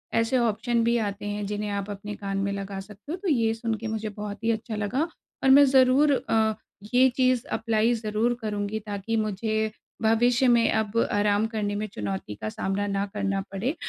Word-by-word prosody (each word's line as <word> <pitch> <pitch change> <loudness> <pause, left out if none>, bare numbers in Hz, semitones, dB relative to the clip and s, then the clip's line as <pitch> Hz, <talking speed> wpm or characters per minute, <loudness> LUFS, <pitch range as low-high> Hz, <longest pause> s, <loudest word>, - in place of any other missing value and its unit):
ऐसे 230 +3 +2
ऑप्शन 230 0 +1
भी 235 +1 +2
आते 205 -2 -3
हैं, 205 0 -3
जिन्हें 210 0 -3
आप 200 0 -3
अपने 205 +1 -6
कान 195 -1 -4
में 200 0 0
लगा 195 0 -5
सकते 210 +8 -10
हो। - - -1
तो 385 +1 -5
ये 230 -6 +2
सुनके 225 -1 -3
मुझे 220 -1 -3
बहुत 210 +1 -7
ही 230 - +3
अच्छा 220 0 -3
लगा 215 - -1 0.4
और 270 - +4
मैं 285 +2 +8
ज़रूर 265 +2 +5 0.2
अ, 220 -1 +3 0.4
ये 260 +1 +6
चीज़ 255 -2 +2
अप्लाय 225 +1 +2
ज़रूर 220 +1 0
करुँगी, 210 0 -2
ताकि 205 +1 -4
मुझे 215 +1 -1 0.3
भविष्य 235 +3 +3
में 235 -1 +4
अब 220 0 -1
आराम 205 +1 +2
करने 210 -2 -2
में 215 +1 -2
चुनौती 105 - -5
का 110 - -2
सामना 195 - -2
ना 200 0 0
करना 195 -1 -1
पड़े 225 - -2
215 Hz, 190 wpm, -26 LUFS, 205-230 Hz, 0.4 s, मैं